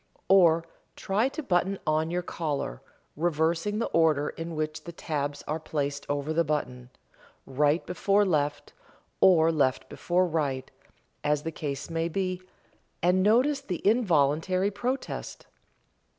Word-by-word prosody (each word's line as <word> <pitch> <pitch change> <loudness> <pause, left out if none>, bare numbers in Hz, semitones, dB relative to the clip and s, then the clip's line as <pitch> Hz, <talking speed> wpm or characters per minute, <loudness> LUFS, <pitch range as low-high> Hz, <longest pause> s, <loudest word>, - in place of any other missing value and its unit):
Or 170 -4 +5 0.3
try 210 +7 0
to 310 +3 -6
button 190 -2 +1
on 155 +1 +1
your 175 +1 -2
collar, 145 - -3 0.3
reversing 165 +5 0
the 230 - 0
order 155 -3 +2
in 165 0 -6
which 155 0 -3
the 170 - -6
tabs 145 -3 -4
are 155 +2 -2
placed 145 -2 -3
over 145 +2 -1
the 170 +1 +2
button 125 -5 -3 0.6
right 145 +4 +1
before 200 +2 +2
left, 145 -5 -1 0.5
or 165 -3 +5
left 135 -5 0
before 180 +1 +1
right, 145 -6 -2 0.5
as 150 0 +1
the 165 - -3
case 145 -3 -5
may 165 0 -1
be, 185 +1 -2 0.6
and 180 +2 +3
notice 255 +8 +3
the 190 -7 -3
involuntary 185 - +2
protest. 250 +6 -4
165 Hz, 135 wpm, -27 LUFS, 150-185 Hz, 0.6 s, Or